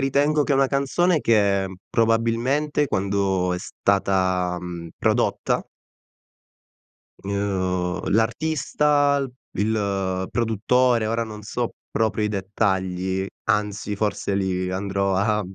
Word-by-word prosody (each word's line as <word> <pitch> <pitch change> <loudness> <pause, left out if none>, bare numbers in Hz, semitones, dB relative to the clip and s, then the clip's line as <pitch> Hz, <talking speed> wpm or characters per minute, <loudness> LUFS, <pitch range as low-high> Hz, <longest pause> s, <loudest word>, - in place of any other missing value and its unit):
ritengo 145 +3 +2
che 145 - 0
è - - +4
una 135 0 +4
canzone 145 +5 +1
che, 100 -5 +3
mhmm, 95 - -9
probabilmente 115 +7 +1
quando 95 -3 0
è - - -3
stata, 95 -2 0
mhmm, 85 -1 -7
prodotta - - +1 1.6
uhm, 95 -3 -1
l'artista, 145 +5 +2
l 135 -2 -3 0.3
il 100 -3 0
produttore 115 +1 +2
ora 115 +1 0
non 105 -1 -9
so 120 +3 -3 0.2
proprio 110 -1 0
i - - +1
dettagli, 95 -2 -1 0.2
anzi, 105 0 -1
forse, 100 -1 -1
lì 95 -1 -1
andrò 100 +1 -1
a, 105 +2 +1
mhmm, 95 0 -10
105 Hz, 115 wpm, -23 LUFS, 95-120 Hz, 1.6 s, è